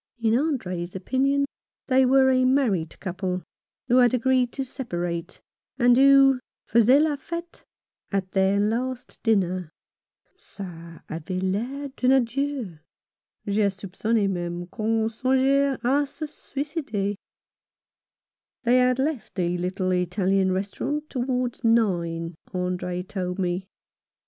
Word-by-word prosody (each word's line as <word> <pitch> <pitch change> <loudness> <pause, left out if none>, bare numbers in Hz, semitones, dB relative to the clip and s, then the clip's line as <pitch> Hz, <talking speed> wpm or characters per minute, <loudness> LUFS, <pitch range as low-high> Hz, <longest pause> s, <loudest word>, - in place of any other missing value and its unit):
In 225 -1 +1
Andre's 185 - -2
opinion 275 +8 +1 0.4
they 260 -1 +4
were 265 0 +5
a 255 0 +3
married 245 - +1
couple, 185 -1 -3 0.4
who 250 0 +4
had 245 -1 +5
agreed 250 0 +2
to 270 - -3
separate, 175 - -4 0.4
and 245 -1 +5
who 270 0 +6 0.3
faisaient 245 +6 +5
la 310 -2 +1
fete 335 +4 -7 0.5
at 195 -2 -1
their 195 +1 +2
last 245 +4 -2
dinner. 185 -6 +1 0.7
"Ca 170 - -10
avait 165 +3 -4
l'air 245 +10 -2
d'un 255 +1 +3
adieu. 260 - -1 0.7
J'ai 205 0 +2
soupconne 200 +3 -1
meme 175 -1 -3
qu'on 220 0 0
songeait 265 +4 +2
a 280 +4 +2
se 310 +3 -6
suicider." 280 -9 -3 1.5
They 245 +1 +4
had 250 0 +3
left 275 -2 -2
the 175 -2 0
little 185 +1 -1
Italian 185 +1 +1
restaurant 205 +11 -3
towards 250 -1 -2
nine, 175 -7 +1 0.2
Andre 180 0 -2
told 180 -1 -4
me. 185 0 -2
225 Hz, 115 wpm, -25 LUFS, 185-265 Hz, 1.5 s, who